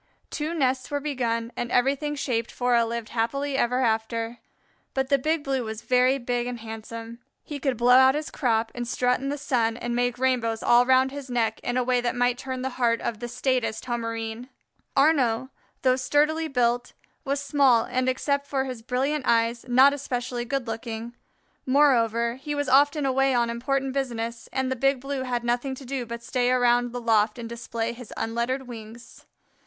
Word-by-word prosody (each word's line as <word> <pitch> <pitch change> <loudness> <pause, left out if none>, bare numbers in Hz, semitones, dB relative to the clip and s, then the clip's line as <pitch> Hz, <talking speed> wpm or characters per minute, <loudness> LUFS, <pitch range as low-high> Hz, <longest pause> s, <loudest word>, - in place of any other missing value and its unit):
Two 315 +3 -3
nests 260 -4 0
were 290 - -1
begun 240 -5 -2
and 240 0 -4
everything 280 +4 +1
shaped 235 -5 -1
for 245 0 0
a 235 -1 +5
"lived 230 -1 -4
happily 275 +5 -1
ever 250 -1 +1
after." 230 0 -1 0.6
But 265 0 0
the 280 -1 +3
Big 310 +3 0
Blue 270 -2 -1
was 220 -1 -6
very 255 +1 +3
big 245 -1 -2
and 245 -1 -5
handsome. 225 +1 -8 0.2
He 295 -2 -6
could 265 -3 -1
blow 245 +2 +4
out 260 +1 +7
his 300 0 -3
crop 225 -4 0
and 240 -1 -4
strut 250 0 +1
in 275 +2 -3
the 290 - -2
sun 235 -5 0
and 240 0 -3
make 245 0 0
rainbows 245 -3 0
all 240 +1 +5
round 260 0 +4
his 280 -1 -8
neck 235 -2 0
in 245 +1 -2
a 255 - +2
way 250 0 +1
that 240 +1 -1
might 245 0 +1
turn 260 -1 -4
the 265 - -2
heart 230 -1 +3
of 225 -3 -3
the 240 - -4
staidest 245 -2 -1
Homerine. 230 0 -4 0.5
Arnaux, 260 -4 +3 0.3
though 255 -1 +4
sturdily 300 +5 +1
built, 245 -3 0 0.3
was 280 -1 -1
small 275 -4 +3
and 255 +1 0
except 280 +2 -1
for 270 -2 0
his 255 -3 -6
brilliant 260 +4 -1
eyes, 230 0 +2
not 260 +3 +6
especially 245 -3 -3
good 270 0 -2
looking. 225 0 -5 0.5
Moreover, 235 -4 +3
he 295 +1 -3
was 290 -1 -1
often 285 +2 +4
away 270 0 +2
on 235 -1 +2
important 265 +3 -1
business, 235 -4 -3
and 260 -1 -1
the - - 0
Big 270 +1 +2
Blue 275 +1 -4
had 245 -2 -2
nothing 245 +3 -1
to 265 - -11
do 250 -2 -4
but 235 +1 -6
stay 245 0 0
around 245 -1 +3
the 245 - -4
loft 220 -2 +2
and 235 -1 -6
display 235 0 -4
his 240 -2 -11
unlettered 235 +3 -2
wings. 230 0 -11
250 Hz, 190 wpm, -25 LUFS, 235-270 Hz, 0.6 s, out